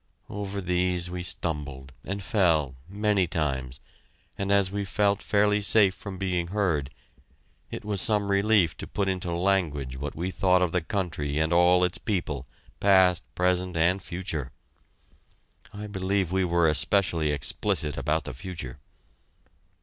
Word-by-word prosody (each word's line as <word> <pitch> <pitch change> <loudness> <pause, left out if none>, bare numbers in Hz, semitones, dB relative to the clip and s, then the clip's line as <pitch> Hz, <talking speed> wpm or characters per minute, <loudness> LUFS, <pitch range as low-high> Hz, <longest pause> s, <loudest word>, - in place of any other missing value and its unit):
Over 100 -1 -4
these 90 -1 0
we 90 0 -4
stumbled, 75 -7 -2
and 100 +1 -4
fell, 85 - +2 0.2
many 100 -2 +1
times, 65 -6 -2 0.5
and 100 0 -2
as 100 -2 +3
we 100 0 -2
felt 100 +1 +1
fairly 105 0 +2
safe 100 -2 +5
from 100 -1 -8
being 90 -2 -1
heard, 85 -8 0 0.8
it - - -7
was 100 -3 0
some 105 -2 +1
relief 100 -4 +3
to - - -7
put 100 -1 -2
into 90 -2 -2
language 85 -8 0
what 70 +1 -5
we 90 +4 -3
thought 90 -1 +3
of 90 - 0
the 90 - 0
country 80 -6 -3
and 80 +2 +1
all 90 +1 +5
its 90 0 0
people, 90 - -3 0.3
past, 95 -3 +4
present, 90 -1 0
and 90 +4 +2
future. 80 -8 -4 1.2
I 105 +1 -7
believe 95 -2 -1
we 95 0 +1
were 85 -1 +2
especially 80 0 +2
explicit 75 0 0
about 75 +3 0
the - - -6
future! 70 -5 -7
90 Hz, 145 wpm, -26 LUFS, 80-100 Hz, 1.2 s, safe